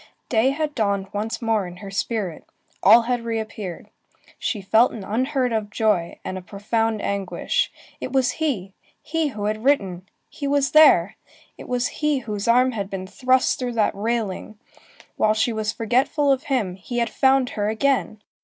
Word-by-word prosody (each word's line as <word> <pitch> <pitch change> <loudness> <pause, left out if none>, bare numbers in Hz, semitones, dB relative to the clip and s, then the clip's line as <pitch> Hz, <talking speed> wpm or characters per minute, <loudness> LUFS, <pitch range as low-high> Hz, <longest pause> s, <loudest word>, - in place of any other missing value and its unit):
Day 235 +2 +3
had 300 +2 -2
dawned 200 -5 -1
once 215 +3 -3
more 220 -4 +1
in 175 0 -10
her 195 0 -9
spirit; 195 -4 -3 0.4
all 225 +4 +7
had 245 0 -1
reappeared. 220 -5 -5 0.5
She 215 - -2
felt 220 +5 +4
an 215 - -7
unheard 255 +4 0
of 215 -2 -1
joy, 210 -6 0
and 185 - -4
a - - -11
profound 215 +3 -1
anguish. 200 - -1 0.3
It - - -5
was 260 -2 +2
he! 200 -12 -1 0.3
he 325 0 0
who 210 -7 -4
had 215 +1 -2
written! 195 -10 +1 0.2
he 285 - -5
was 280 -1 +1
there! 245 - +6 0.4
it - - -11
was 250 0 0 0.2
he 300 -1 +2
whose 210 -5 -4
arm 250 +2 +4
had 200 -4 -4
been 190 -1 -5
thrust 255 +6 +1
through 250 -2 -2
that 220 -2 +1
railing! 215 -1 -3 0.6
While 215 0 +3
she 225 +2 +1
was 215 0 -1
forgetful 255 +6 +1
of 265 -1 0
him, 235 -10 0
he 240 +6 -6
had 235 -1 0
found 265 -2 +3
her 205 -1 -2
again! 220 -2 0
225 Hz, 175 wpm, -23 LUFS, 205-255 Hz, 0.6 s, all